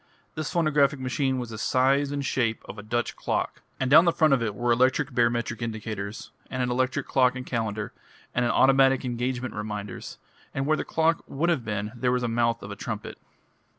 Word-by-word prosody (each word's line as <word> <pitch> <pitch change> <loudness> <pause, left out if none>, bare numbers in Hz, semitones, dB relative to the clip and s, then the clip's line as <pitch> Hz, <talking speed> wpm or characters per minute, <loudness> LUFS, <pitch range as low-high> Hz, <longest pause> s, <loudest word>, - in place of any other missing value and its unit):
This 155 -1 -4
phonographic 150 -4 +2
machine 130 +1 0
was 120 -2 -4
the 110 - -6
size 135 +4 +2
and 140 -1 -2
shape 115 -4 0
of 105 - -8
a - - -5
Dutch 120 +3 -2
clock, - - -2 0.2
and 130 0 0
down 165 +4 +8
the 170 - +5
front 155 -3 +3
of 130 - +2
it 110 -3 -2
were 120 +3 0
electric 130 +4 +2
barometric 120 -2 0
indicators, 110 -2 -5 0.2
and 130 0 -2
an 125 - -1
electric 130 +2 0
clock 130 -1 +3
and 125 0 -6
calendar, 110 -3 -3 0.4
and 125 - +1
automatic 135 +1 +4
engagement 125 +1 -2
reminders, 105 -2 -6 0.4
and 135 - -1
where 155 +2 +3
the - - -2
clock 160 0 +1
would 160 +5 0
have 140 -8 0
been 105 -1 -3
was 125 -1 +1
the - - +1
mouth 115 0 0
of 100 - -7
a - - -5
trumpet. 110 -1 -6
125 Hz, 195 wpm, -26 LUFS, 115-135 Hz, 0.4 s, down